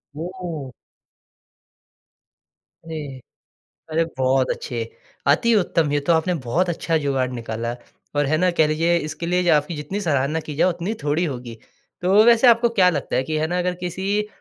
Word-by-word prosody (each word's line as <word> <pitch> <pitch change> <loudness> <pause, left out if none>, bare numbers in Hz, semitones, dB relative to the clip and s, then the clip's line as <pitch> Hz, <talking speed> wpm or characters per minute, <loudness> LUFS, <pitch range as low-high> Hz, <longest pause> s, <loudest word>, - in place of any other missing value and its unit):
ओह! 165 -5 -6 2.1
अरे! 150 -5 -6 0.7
अरे, 165 +1 +2
बहुत 130 0 +2
अच्छे, 120 -2 -4 0.5
अति 230 +11 +4
उत्तम, 165 -6 +1
ये 145 - +2
तो 155 +4 +1
आपने 165 +3 +1
बहुत 175 +9 +1
अच्छा 165 -1 0
जुगाड़ 135 -3 0
निकाला। 115 0 -4 0.4
और, 145 0 +2
है 155 +3 +1
ना? 180 +2 +3
कह 155 -3 +3
लीजिए 165 +3 +2
इसके 155 +1 -5
लिए 180 0 +1
आपकी 150 +2 +2
जितनी 150 +8 -4
सराहना 150 -1 0
की 150 -2 -7
जाए, 185 - +3
उतनी 175 +5 -3
थोड़ी 150 +4 +1
होगी। 125 -5 -6 0.5
तो 195 +4 +5
वैसे 235 +1 +6
आपको 235 0 +5
क्या 185 -5 +4
लगता 145 -5 -2
है 130 - +2
कि, 155 +2 -2
है 155 +1 0
ना, 180 +2 -1
अगर 180 0 0
किसी 195 +4 -1
160 Hz, 165 wpm, -22 LUFS, 145-180 Hz, 2.1 s, वैसे